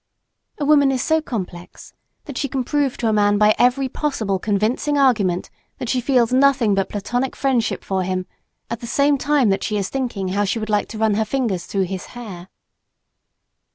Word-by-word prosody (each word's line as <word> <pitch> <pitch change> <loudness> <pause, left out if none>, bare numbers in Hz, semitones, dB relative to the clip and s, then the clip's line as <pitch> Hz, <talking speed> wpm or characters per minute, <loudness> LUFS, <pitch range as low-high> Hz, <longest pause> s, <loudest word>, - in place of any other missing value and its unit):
A 290 - -2
woman 285 -2 +5
is 260 -1 -1
so 320 0 +2
complex 185 - -7 0.3
that 285 - -8
she 280 - -1
can 265 -1 -1
prove 285 0 0
to 235 - -1
a 220 - +2
man 205 -1 +3
by 210 +1 +5
every 255 +2 +3
possible 225 -9 -2
convincing 220 +9 0
argument 210 -10 +2 0.3
that 245 - -5
she 255 -1 +1
feels 250 -2 +2
nothing 265 -5 +4
but 195 -1 0
platonic 245 +6 -2
friendship 260 -4 0
for 190 -1 -1
him, 185 0 -2 0.4
at 235 - -4
the 235 - -7
same 280 +4 +3
time 285 -5 +2
that 195 - 0
she 215 - -1
is 195 -2 -2
thinking 235 -8 -3
how 200 +2 0
she 205 +3 -1
would 215 -1 -4
like 210 -1 +1
to 220 - -8
run 220 -1 +2
her 220 +2 +1
fingers 215 -6 -2
through 195 -1 0
his 185 0 -5
hair. 190 -7 -8
230 Hz, 195 wpm, -21 LUFS, 200-270 Hz, 0.4 s, woman